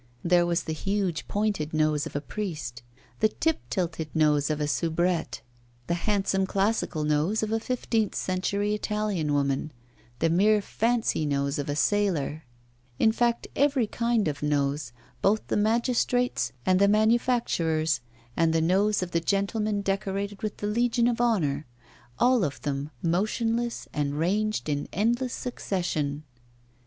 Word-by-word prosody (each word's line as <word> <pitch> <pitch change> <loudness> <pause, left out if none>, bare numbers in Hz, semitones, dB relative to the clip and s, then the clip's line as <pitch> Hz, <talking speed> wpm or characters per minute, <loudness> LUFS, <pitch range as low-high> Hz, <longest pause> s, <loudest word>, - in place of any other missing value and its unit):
There 175 0 +4
was 170 -1 0
the 160 - -3
huge 195 -1 -2
pointed 200 -7 -1
nose 155 -1 +1
of - - -12
a 145 - -1
priest, 150 - -5 0.4
the 215 - +4
tip 320 +5 0
tilted 165 -4 -2
nose 150 -2 +3
of 155 -1 -1
a 150 - 0
soubrette, 165 -2 0 0.4
the 170 - -1 0.2
handsome 195 -2 +1
classical 195 -5 0
nose 150 +9 +1
of 215 - -2
a 225 - +1
fifteenth 225 -3 -1
century 200 +3 -1
Italian 210 -7 -1
woman, 140 +1 0 0.5
the 165 +4 +1
mere 210 +5 +4
fancy 225 -3 0
nose 140 0 0
of 145 +1 -3
a 145 - -1
sailor 160 -2 0 0.5
in 220 - +4
fact, 235 +1 +1
every 275 -4 +3
kind 230 -2 0
of 145 -2 -3
nose, 145 -2 0 0.3
both 210 +2 +2
the - - +1
magistrate's 240 +3 +1
and 185 0 +3
the 200 - +5
manufacturer's, 210 - +2 0.3
and 165 -1 +2
the 165 - +3
nose 190 +5 +2
of 180 - -6
the 170 - +1
gentleman 205 +3 0
decorated 195 0 -2
with 215 -1 -3
the - - -4
Legion 235 +2 +2
of 240 -1 0
Honour 155 - +1 0.5
all 245 -3 +4
of 140 -5 -2
them 145 0 -2
motionless 225 +7 0
and 145 -1 -1
ranged 210 +6 0
in 145 -1 -2
endless 240 +5 0
succession! 160 - -2
195 Hz, 145 wpm, -27 LUFS, 155-215 Hz, 0.5 s, the